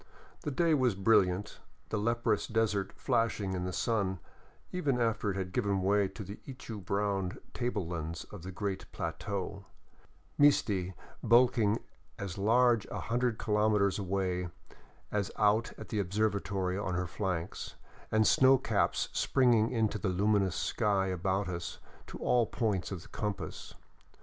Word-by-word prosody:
The - - -3
day 165 +3 +2
was 130 -7 +2
brilliant, 95 -1 +2 0.3
the 110 - -1
leprous 115 +2 +1
desert 105 -4 0
flashing 105 -4 0
in 90 -1 -2
the 90 - -2
sun 95 +1 0 0.5
even 145 -8 0
after 115 -2 +1
it 95 - -1
had 95 -1 -3
given 100 -4 0
way 100 +1 +3
to 105 - -8
the 100 +2 -8
ichu 115 -6 -7
brown 100 -1 -1 0.2
tablelands 85 -8 -3
of - - -8
the 95 +3 -7
great 95 0 -4
plateau, 95 +4 -4 0.7
Misti 100 -11 +3 0.3
bulking 115 -2 +4 0.4
as 100 -1 -5
large 115 +1 +4
a - - -5
hundred 120 -1 0
kilometers 105 -2 +2
away 90 -2 -1 0.6
as 100 -2 0
out 105 +3 +3
at 110 - -9
the 110 - -1
observatory 100 -1 0
on 95 -3 -2
her 90 +1 0
flanks, 85 +1 -4 0.4
and 110 0 +4
snow 130 +3 +6
caps - - 0
springing 120 -5 +3
up - - -4
into 110 -2 +1
the 95 - -1
luminous 100 0 +2
sky 100 -4 +1
about 95 +2 0
us 85 -1 -4 0.3
to - - -8
all 120 -3 +2
points 105 -7 -1
of 90 -3 -5
the - - -14
compass. 105 -2 -5
100 Hz, 145 wpm, -31 LUFS, 95-115 Hz, 0.7 s, snow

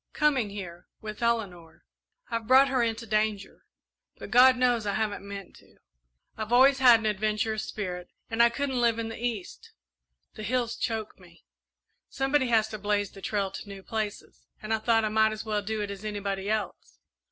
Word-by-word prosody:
"Coming 280 -8 +2
here 180 -3 -8
with 215 0 -8
Eleanor. 200 -8 -2 0.5
I've 230 -1 -3
brought 265 +2 +6
her 260 -2 +1
into 230 0 -1
danger, 215 -2 -2 0.5
but - - -9
God 255 +1 +7
knows 245 -4 +1
I 200 - 0
haven't 215 -1 -2
meant 200 -2 -9
to. - - -22 0.6
I've 220 0 -5
always 265 +3 +6
had 245 -3 +7
an 225 - -6
adventurous 215 +1 -1
spirit, 180 -4 -5 0.2
and 230 0 0
I 235 - +7
couldn't 265 0 -2
live 235 -1 +3
in 230 -1 -3
the 225 +1 -8
East 225 -7 -5 0.6
the - - -9
hills 235 +2 -1
choke 220 -4 -4
me. 175 -2 -19 0.6
Somebody 270 0 +1
has 225 -2 +3
to 215 -1 -6
blaze 205 0 -1
the 195 - -13
trail 200 -1 -1
to - - -7
the 205 - -15
new 195 -1 -9
places, 215 -1 -5
and 215 +1 -3
I 220 - +1
thought 225 0 +2
I - - 0
might 220 0 +3
as 215 +1 -7
well 210 -1 -1
do 215 +1 -3
it 205 -1 -3
as 200 +1 -8
anybody 200 -2 -3
else. 215 0 -3
220 Hz, 190 wpm, -27 LUFS, 205-235 Hz, 0.6 s, God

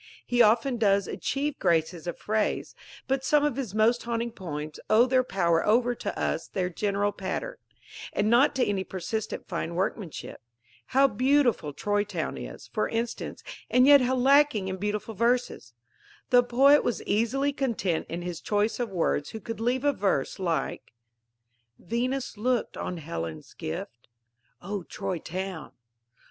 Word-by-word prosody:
He 245 0 +2
often 235 +3 +4
does 200 -3 +2
achieve 285 +1 -2
graces 165 0 +1
of 175 - -3
phrase; 215 0 -1 0.3
but 270 0 0
some 295 +2 +3
of 295 -5 0
his 245 -7 -4
most 225 +3 +3
haunting 235 0 -2
poems 155 -7 -6
owe 225 +3 +6
their 255 0 +3
power 170 -7 +1
over 240 +3 +3 0.2
us - - -1
to - - -35
their 180 -2 0
general 205 +2 0
pattern, 205 - -4 0.5
and 205 - 0
not 245 +6 +4
to 260 - +2
any 195 -2 -1
persistent 200 +4 -4
fine 170 +1 -3
workmanship. 185 -1 -4 0.5
How 270 +1 +4
beautiful 255 - +2
Troy 205 +8 0
Town 185 -6 -4
is, - - -8
for - - 0
instance, 230 +1 -4 0.3
and 250 +1 +5
yet 285 -1 +8
how 255 +1 +1
lacking 265 -6 +4
in 190 - -3
beautiful 210 +3 -3
verses! 235 - 0 0.6
The 245 -1 +7
poet 270 +4 +5
was 240 - -1
easily 255 +7 +1
content 225 - -1
in 170 +1 -4
his 175 -2 -5
choice 210 +3 0
of 240 -2 -1
words 165 -5 0
who 220 - -7
could 225 -1 -6
leave 245 +4 0
a 285 - +4
verse 195 - -1
like: 170 -9 -2 0.8
Venus 245 +4 -2
looked 245 +2 0
on 180 - -4
Helen's 80 - -6
gift; 115 +9 -6 0.6
_(O 195 -1 -5
Troy 180 - -3
Town!) 185 -1 -5
215 Hz, 155 wpm, -27 LUFS, 185-250 Hz, 0.8 s, yet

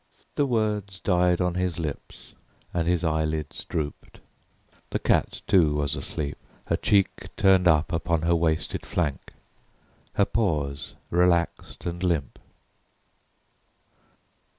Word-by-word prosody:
The 145 - +1
words 105 -5 -1
died 90 -2 +2
on 90 -1 +1
his 90 -2 -1
lips 80 -4 -6 0.4
and 85 -1 0
his 90 -1 +1
eyelids 80 -2 -1
drooped. 75 -2 -5 0.7
The - - 0
cat, - - +1
too, 80 -6 +4
was 75 -1 0
asleep, 75 +1 -4 0.3
her - - +1
cheek 100 -2 +1
turned 95 -2 +5
up 80 -1 +3
upon 85 -1 0
her 85 +1 +3
wasted 80 -1 0
flank, 75 -6 -2 0.8
her 100 - +4
paws 75 -11 -1 0.2
relaxed 85 -1 +1
and 85 0 -3
limp. 85 -7 -1
85 Hz, 115 wpm, -26 LUFS, 80-90 Hz, 0.8 s, turned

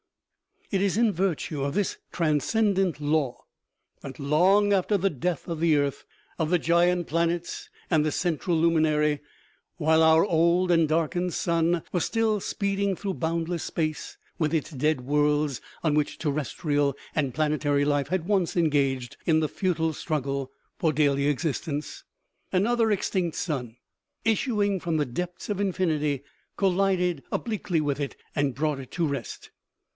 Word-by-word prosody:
It 195 -2 +1
is 200 0 +1
in 230 -2 +4
virtue 170 -5 -1
of 140 +1 -2
this 205 -2 0
transcendent 180 +2 +1
law 145 -3 0 0.6
that, 135 -2 -9
long 185 +9 +3
after 200 +2 +2
the 195 +1 +1
death 160 +3 -3
of 165 -2 -3
the 165 -2 +3
earth, 140 -1 -1 0.3
of 160 -1 0
the 180 - +4
giant 175 +1 +2
planets 170 +1 -1 0.2
and 155 -3 +3
the 155 - +1
central 170 +1 0
luminary, 155 -2 +2 0.6
while 160 +1 +3
our 160 +1 +6
old 175 0 +3
and 165 -2 +4
darkened 170 +3 0
sun 170 -1 +1
was 175 - 0
still 225 -2 +1
speeding 200 0 -1
through 195 0 -4
boundless 165 +1 -2
space, 155 -2 -3 0.2
with 155 -1 +1
its 160 +1 -2
dead 150 0 0
worlds 145 0 +1 0.2
on 155 -3 +2
which 150 -1 0
terrestrial 145 -1 -1 0.2
and 140 -5 -1
planetary 150 -1 +1
life 145 -1 +1
had 180 0 -1
once 190 -3 +1
engaged 140 -6 +1
in 160 -2 +4
the 155 - 0
futile 165 -4 0
struggle 140 -3 -3 0.3
for 160 - +2
daily 140 -1 +2
existence, 150 0 -2 0.5
another 225 +4 +2
extinct 185 -4 0
sun, 125 -9 -3 0.5
issuing 210 -3 +1
from 170 -1 -2
the 150 - +1
depths 175 +8 -5
of 205 -2 -1
infinity, 155 -8 0 0.3
collided 185 -4 +1
obliquely 205 -8 -1
with 145 -1 -1
it 140 -2 -3 0.2
and 140 -4 0
brought 150 0 -1
it 130 - -9
to 170 - -1
rest 140 -5 -5
160 Hz, 150 wpm, -26 LUFS, 145-180 Hz, 0.6 s, our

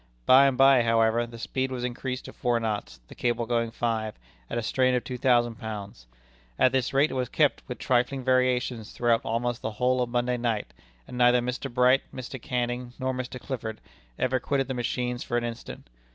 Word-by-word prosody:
By 135 +2 +7
and 135 -2 0
by, 135 -1 +6
however, 115 0 +2
the 115 0 -10
speed 130 +3 -2
was 125 -1 -4
increased 125 +1 -4
to - - -9
four 120 -2 0
knots, 105 - -3
the - - -12
cable 120 -1 -1
going 115 0 0
five, 115 -2 -2 0.3
at - - -3
a 120 - -1
strain 130 +2 +2
of 125 - 0
two 125 -1 -6
thousand 120 -3 +2
pounds. 100 - -7 0.5
At 130 - +4
this 130 -2 0
rate 140 +3 +3
it - - -4
was 125 -2 -2
kept, 150 -3 +2
with 125 - -5
trifling 130 +2 0
variations, 125 -3 +1
throughout 120 -1 +2
almost 120 +1 -2
the 110 - -3
whole 125 +3 +1
of 125 - -1
Monday 125 0 0
night, 115 -3 -2 0.3
and 125 - -7
neither 120 0 +5
Mr. 125 +2 -3
Bright, 125 +2 +4
Mr. 130 0 -7
Canning, 120 0 -2
nor 130 -1 -1
Mr. 125 0 -5
Clifford 115 -5 -5 0.4
ever 130 0 +1
quitted 135 +1 -1
the 130 - -2
machines 125 0 -2
for 120 - -1
an 120 - -1
instant. 120 - -7
125 Hz, 200 wpm, -27 LUFS, 115-130 Hz, 0.5 s, By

